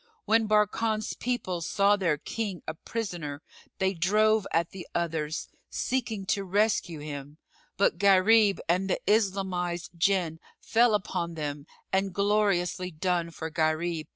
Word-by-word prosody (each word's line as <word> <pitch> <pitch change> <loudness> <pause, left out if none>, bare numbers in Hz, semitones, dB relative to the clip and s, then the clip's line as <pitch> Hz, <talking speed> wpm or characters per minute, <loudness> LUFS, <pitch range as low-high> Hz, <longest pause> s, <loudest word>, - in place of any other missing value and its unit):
When 220 +1 +3
Barkan's 215 +1 +1
people 205 -8 -2
saw 200 +4 +3
their 170 -7 +1
king 200 +2 -4
a - - -2
prisoner, 165 -6 -5 0.3
they 190 0 +1
drove 210 +4 +2
at 170 0 +1
the 190 -2 -9
others, 160 -2 -2 0.2
seeking 225 -6 -2
to 200 +1 0
rescue 195 -3 +1
him, 145 0 -7 0.4
but 190 -3 +2
Gharib 200 +1 +5
and 185 +3 +1
the - - +1
Islamised 185 -5 0
Jinn 170 -2 +1 0.2
fell 230 -1 +3
upon 175 -4 -2
them 145 -1 -5 0.3
and 190 -1 +1
gloriously 200 -3 +1
done 175 0 -1
for 160 -1 -6
Gharib! 155 0 0
185 Hz, 130 wpm, -28 LUFS, 165-210 Hz, 0.4 s, Gharib